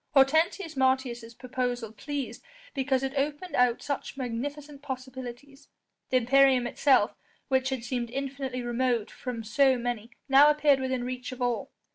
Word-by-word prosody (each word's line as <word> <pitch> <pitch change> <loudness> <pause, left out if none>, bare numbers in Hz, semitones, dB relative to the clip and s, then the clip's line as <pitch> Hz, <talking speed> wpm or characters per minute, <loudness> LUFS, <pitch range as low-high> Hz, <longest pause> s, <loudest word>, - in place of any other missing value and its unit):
Hortensius 315 +5 +3
Martius' 260 -3 0
proposal 245 -2 -3
pleased 280 +4 -5 0.3
because 265 -1 0
it 270 0 -2
opened 290 +4 -2
out 250 -1 +3
such 280 -1 -4
magnificent 280 +4 -5
possibilities: 260 0 -8 0.4
the 255 - +4
imperium 260 0 +4
itself, 245 -2 +3 0.4
which 260 -1 +2
had 265 -3 -3
seemed 240 -1 -2
infinitely 265 -1 -4
remote 240 -2 0
from 245 -3 -5
so 260 +4 +3
many, 235 -2 -3 0.2
now 280 +2 +7
appeared 295 -2 +4
within 260 -1 -1
reach 250 0 -5
of 255 - -8
all. 245 -1 -1
260 Hz, 140 wpm, -28 LUFS, 245-275 Hz, 0.4 s, now